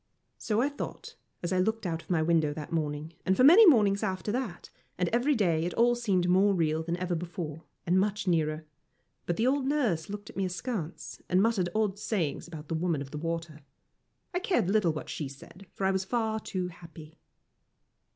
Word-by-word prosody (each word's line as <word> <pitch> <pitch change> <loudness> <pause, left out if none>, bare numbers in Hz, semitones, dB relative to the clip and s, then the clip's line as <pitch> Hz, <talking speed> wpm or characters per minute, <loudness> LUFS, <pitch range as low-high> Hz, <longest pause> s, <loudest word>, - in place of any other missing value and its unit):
So 215 +1 0
I 280 - +1
thought, 285 - -7 0.3
as 175 - -1
I 185 - +2
looked 220 +3 0
out 165 -2 -2
of - - -24
my 165 -3 +2
window 160 -3 +2
that 155 +2 -7
morning 155 0 -2
and 190 0 +1
for - - +4
many 370 +10 +9
mornings 205 - +5
after 190 0 -2
that, 230 -7 -4 0.3
and 180 - +1
every 250 +5 +2
day 170 -8 +2
it 175 - -3
all 240 +1 +4
seemed 200 -7 +1
more 195 +2 +4
real 160 -2 +1
than 170 +1 -2
ever 180 0 -2
before, 165 -2 -5 0.2
and 180 +2 +3
much 200 0 -1
nearer. 155 -2 +1 0.6
But 175 - -1
the 225 - +1
old 270 +1 +1
nurse 230 - 0
looked 205 0 -7
at - - -24
me 195 - 0
askance, 185 -1 -4
and 185 - +3
muttered 200 -4 +2
odd 210 -2 0
sayings 175 -11 -2
about 155 -3 -9
the - - -3
Woman 160 -3 0
of 135 - -12
the 150 - -5
Water. 165 -1 -4 0.7
I 360 - +1
cared 360 - +1
little 205 -6 +3
what 155 - -6
she 150 - -4
said, 160 +8 -13
for 195 - -3
I 190 - +3
was 190 0 0
far 220 +1 -1
too 185 -3 -3
happy. 165 -2 -13
180 Hz, 205 wpm, -29 LUFS, 165-215 Hz, 0.7 s, many